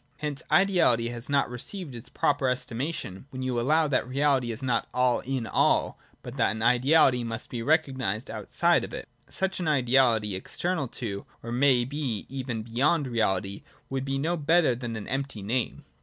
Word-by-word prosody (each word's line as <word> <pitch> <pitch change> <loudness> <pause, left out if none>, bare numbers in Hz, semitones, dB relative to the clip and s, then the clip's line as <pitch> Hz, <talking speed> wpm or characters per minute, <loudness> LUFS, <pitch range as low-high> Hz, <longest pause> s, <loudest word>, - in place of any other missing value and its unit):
Hence 150 -1 -4
ideahty 170 -12 +3
has 120 +2 -6
not 140 -1 +2
received 140 - -6
its 115 -2 -9
proper 140 -2 +1
estima 125 +3 -2
tion, 95 - -7
when 130 -2 -6
you 125 -2 -1
allow 155 +6 +3
that 130 -3 0
reality 135 -2 +1
is 115 +4 -7
not 125 -2 0
all 125 -1 +3
in 130 -2 -3
all, - - +2 0.2
but - - -8
that - - +3
an 110 +1 -3
ideality 125 +1 +4
must 115 0 -5
be 120 - -3
recognised 130 - 0
outside 110 -2 +1
of - - -6
it. - - -7 0.2
Such 190 0 -2
an 175 - -2
ideality, 125 -6 +3
external 165 - -2
to 105 -4 -6 0.2
or 115 - -6
it - - -2
may 125 -1 +4
be 135 -5 -3
even 130 -4 -4
beyond 140 +7 +1
reality, 100 -5 -1 0.3
would 135 -1 -1
be 135 0 -2
no 160 +5 0
better 160 -2 +3
than 120 -1 -5
an 110 - -6
empty 135 -5 -3
name. 120 +4 -2
130 Hz, 185 wpm, -27 LUFS, 115-140 Hz, 0.3 s, ideality